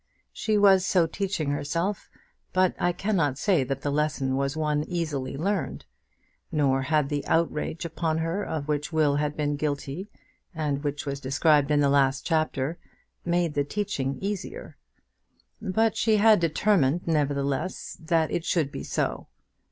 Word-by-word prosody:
She 215 -1 0
was 195 -2 +6
so 185 -2 +3
teaching 165 -4 -2
herself, 165 +7 -2 0.4
but 185 -1 +3
I 175 - +2
cannot 175 -7 0
say 180 -5 +2
that 135 +1 -3
the 145 - 0
lesson 145 -3 0
was 140 +2 -1
one 150 -1 0
easily 155 -7 -3
learned; 200 +7 -2 0.7
nor 140 -4 +2
had 150 +1 +1
the 145 -1 -2
outrage 165 0 0
upon 160 -1 -1
her 165 +5 -1
of 155 -5 -4
which 150 +1 -1
Will 150 -3 +2
had 150 0 -1
been 145 -1 0
guilty, 145 +5 -3 0.5
and 145 -2 -1
which 145 0 -3
was 140 -1 -3
described 145 +2 +3
in 150 -1 +3
the 140 - +4
last 135 -1 +2
chapter, 155 -1 0 0.5
made 170 -2 +1
the 145 0 +1
teaching 145 -6 -2
easier. 205 - -5 0.9
But 220 +2 +1
she 220 -1 +3
had 215 -1 +6
determined, 170 -2 +2
nevertheless, 145 +1 -1
that 160 -1 +1
it 170 - -1
should 160 -5 0
be - - -6
so. - - -2
155 Hz, 150 wpm, -26 LUFS, 145-175 Hz, 0.9 s, was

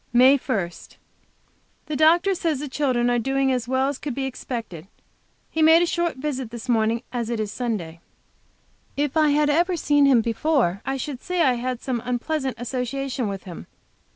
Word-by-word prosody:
MAY 260 +3 +6
1. 200 -10 -2 1.1
The 305 - -4
doctor 335 +6 +4
says 330 -5 -1
the 295 - -4
children 260 -4 0
are 240 - +2
doing 270 +2 +1
as 250 -2 -1
well 260 +1 +1
as, 280 -1 -3
could 280 -5 -5
be 270 0 -2
expected. 230 -10 -6 0.6
He 320 - -1
made 320 +2 +6
a - - +3
short 345 0 -1
visit 265 -3 -3
this 235 +1 -8
morning, 230 -1 +1
as 235 -2 -2
it 235 -2 -2
is 210 -1 -2
Sunday. 210 -10 -4 1.0
If 290 +1 -1
I 310 -1 +4
had 295 0 +3
ever 350 +4 +2
seen 290 -2 +3
him 255 -4 +5
before 230 - 0
I 270 0 -1
should 265 -1 -5
say 360 -1 0
I 260 -4 +4
had 245 0 -4
some 250 -3 -2
unpleasant 260 +2 -2
association 255 +1 -3
with 195 -1 -5
him. 175 -4 -9
260 Hz, 180 wpm, -23 LUFS, 235-295 Hz, 1.1 s, MAY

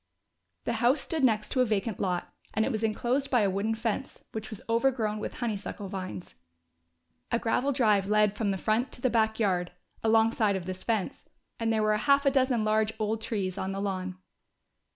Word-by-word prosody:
The - - -1
house 250 +5 +4
stood 320 -4 -3
next 215 -4 +2
to 255 - +2
a - - +4
vacant 215 -1 -1
lot, 180 -3 -2 0.2
and 220 +1 +3
it - - -1
was 220 -1 -2
enclosed 245 +5 0
by 245 -3 +3
a 200 -2 +2
wooden 205 +4 0
fence, 225 +3 -3
which 220 0 -5
was 215 -4 -7
overgrown 230 -2 +1
with - - -5
honeysuckle 205 -4 -4
vines. 185 -2 -6 1.0
A 235 - +3
gravel 245 +4 +1
drive 215 -7 +3
led 210 0 +3
from 205 -1 0
the 195 - 0
front 220 +6 0
to - - -9
the 255 - +2
back 220 -1 +2
yard, 180 -5 +1 0.3
alongside 220 -2 +3
of 185 -2 -4
this 185 0 -5
fence, 220 -5 -2 0.3
and 225 -1 +1
there 220 -1 +2
were 215 0 +3
half 280 +5 +3
a 275 - +5
dozen 260 -4 +2
large 215 0 +2
old 220 +1 -1
trees 200 -4 -2
on 190 0 -2
the 195 - -3
lawn. 185 -2 -3
220 Hz, 195 wpm, -29 LUFS, 200-235 Hz, 1.0 s, a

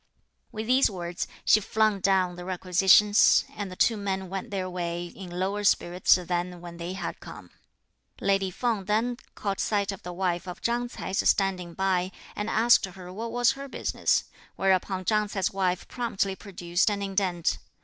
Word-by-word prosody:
With 220 0 -5
these 255 +3 +4
words, 175 -3 -4 0.2
she 215 - +6
flung 215 0 +1
down 185 -2 +2
the 175 - -8
requisitions, 190 +3 +4
and 205 -2 -4
the - - -7
two 225 +4 +3
men 190 -2 -3
went 195 +5 -5
their 190 -3 -2
way 175 -1 -3
in 180 +1 -10
lower 190 +4 -2
spirits 180 -2 +4
than 180 0 -3
when 170 -1 -10
they 170 +2 -5
had 190 - -5
come. - - -11 0.7
Lady 195 -1 +1
Feng 220 0 -1
then 225 +4 0 0.2
caught 200 -2 -3
sight 205 -2 0
of 195 - -8
the 180 - -7
wife 175 -1 -2
of 180 - -7
Chang 240 +1 0
Ts'ai 190 - -6
standing 185 -3 +1
by, 190 -1 0 0.2
and 210 +1 -3
asked 230 0 +4
her 180 -1 -10
what 225 +3 -5
was 245 +1 +3
her 275 +1 -7
business, - - 0 0.3
whereupon 190 0 +1
Chang 210 0 +2
Ts'ai's 195 -3 -1
wife 185 -2 -1
promptly 200 -5 -2
produced 180 -1 -1
an 200 -1 -2
indent. 190 -3 0
195 Hz, 170 wpm, -27 LUFS, 180-210 Hz, 0.7 s, she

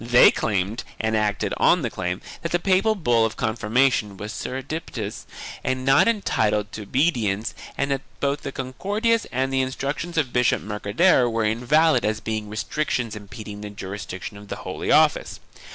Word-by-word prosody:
They 120 +1 +7
claimed, 100 +2 -1 0.2
and 110 0 0
acted 105 -1 0
on 175 -3 +4
the 120 - -1
claim, 90 -1 -3 0.2
that 170 - -3
the 175 - +3
papal 195 +4 +2
bull 120 - +2
of 110 - -1
confirmation 110 -1 +1
was 105 +4 -6
surreptitious 130 -5 -5 0.4
and 130 0 -1
not 135 +6 +5
entitled 105 - +1
to 110 - -6
obedience 115 -4 0 0.2
and 140 0 0
that 135 -1 0 0.2
both 140 +1 0
the 140 - -5
Concordias 205 - -1
and 130 +1 -1
the 135 - +3
Instructions 140 +6 -3
of 140 -6 +1
Bishop 125 0 +2
Mercader 110 - +2
were 115 -1 0
invalid 125 +5 +3
as 110 0 0
being 110 -1 -3
restrictions 115 +1 -2
impeding 105 0 -8
the 105 - -6
jurisdiction 100 0 -7
of 100 0 -12
the - - -4
Holy - - -3
Office. - - +3
120 Hz, 165 wpm, -24 LUFS, 105-140 Hz, 0.4 s, They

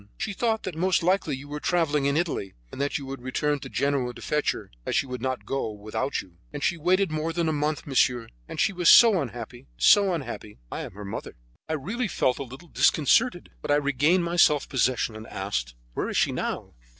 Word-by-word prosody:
She 215 - -3
thought 220 +2 0
that 185 - -4
most 175 +1 +1
likely 180 -5 +1
you 140 +2 -10
were 150 +1 -5
travelling 150 -4 +1
in 140 +1 +1
Italy, 160 - -2 0.2
and - - -6
that 140 - 0
you 140 - -7
would 135 -1 -7
return 145 +3 -1
by - - -8
Genoa 135 -4 0
to - - -11
fetch 150 0 +1
her, - - -9
as - - -2
she - - +2
would 125 -2 -6
not 130 0 -2
go 135 -4 -2
with 105 0 -10
you. 95 -10 -3
And 145 -1 -6
she 175 - +2
waited 180 +2 +2
more 155 +1 -1
than 170 0 -1
a 160 - +1
month, 150 +1 -1
monsieur; 125 -4 +2 0.2
and - - -6
she 220 -2 +2
was 175 -2 +3
so 220 -7 +8
unhappy; 120 - -7
so 195 - +6
unhappy. 135 -10 -5
I - - -4
am - - -7
her 105 +1 -8
mother." 100 - -6 0.3
I - - 0
really 205 - -2
felt 130 -8 0
a - - -2
little 135 +6 -12
disconcerted, 175 - +3
but - - -7
I 145 - +5
regained 145 +5 +2
my 170 +1 -2
self 150 -4 +4
possession, 125 -3 0
and 110 +1 -9
asked: 65 -12 -3 0.2
"Where - - -2
is - - -2
she - - +3
now?" - - -4
145 Hz, 225 wpm, -26 LUFS, 125-175 Hz, 0.3 s, so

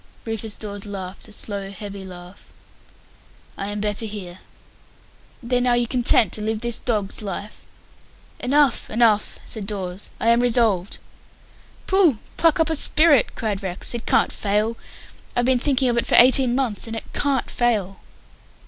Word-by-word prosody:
Rufus 225 -1 -4
Dawes 205 -1 -7
laughed 195 -1 -7
a - - -14
slow, 200 -2 -5
heavy 200 0 -8
laugh. 180 0 -12 1.1
"I 195 - -5
am 205 0 -4
better 210 +2 -1
here." 190 -4 -8 1.0
"Then 245 +1 0
are 240 -1 +3
you 240 - +1
content 235 -5 +3
to 215 - -2
live 220 0 -2
this 235 -1 +1
dog's 210 -5 -2
life?" 205 +1 -6 0.8
"Enough, 280 -1 +2
enough," 220 -2 +2
said 210 -4 -5
Dawes. 190 -2 -5
"I 230 - +1
am 235 0 +5
resolved." 225 -6 +1 0.9
"Pooh! 375 - +3 0.2
Pluck 330 -2 +3
up 325 0 +2
a - - +1
spirit," 300 -2 +4
cried 210 -3 -3
Rex. 190 +2 -2
"It 235 -1 -6
can't - - +3
fail. 210 +3 -1 0.6
I've 245 - +1
been 255 -1 +3
thinking 265 0 +3
of 240 -1 +2
it - - -3
for - - +2
eighteen 255 0 +6
months, 240 -6 -2
and 225 - -5
it 225 - -6
can't 275 -3 -1
fail." 210 -6 0
220 Hz, 155 wpm, -22 LUFS, 200-245 Hz, 1.1 s, eighteen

